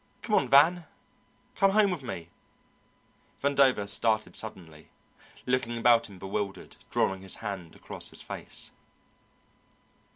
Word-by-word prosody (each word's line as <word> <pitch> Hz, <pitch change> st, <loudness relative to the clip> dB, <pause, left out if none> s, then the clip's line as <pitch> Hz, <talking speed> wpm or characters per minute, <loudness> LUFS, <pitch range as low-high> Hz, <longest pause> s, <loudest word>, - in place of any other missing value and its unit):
come -, -, -3 dB
on, -, -, +4 dB
Van! 160 Hz, +5 st, +5 dB, 0.7 s
come 195 Hz, -, +4 dB
home 210 Hz, -2 st, +4 dB
with 175 Hz, -5 st, -3 dB
me." 85 Hz, -10 st, -7 dB, 1.1 s
Vandover 135 Hz, -7 st, +3 dB
started 110 Hz, +2 st, +2 dB
suddenly, 80 Hz, -8 st, -7 dB, 0.6 s
looking 125 Hz, -2 st, 0 dB
about 115 Hz, -1 st, +4 dB
him 100 Hz, -, -12 dB
bewildered, 95 Hz, +1 st, -4 dB
drawing 95 Hz, -1 st, 0 dB
his 95 Hz, -1 st, -2 dB
hand 100 Hz, -7 st, -6 dB
across -, -, -5 dB
his -, -, -8 dB
face. -, -, -6 dB
110 Hz, 120 wpm, -28 LUFS, 95-135 Hz, 1.1 s, Van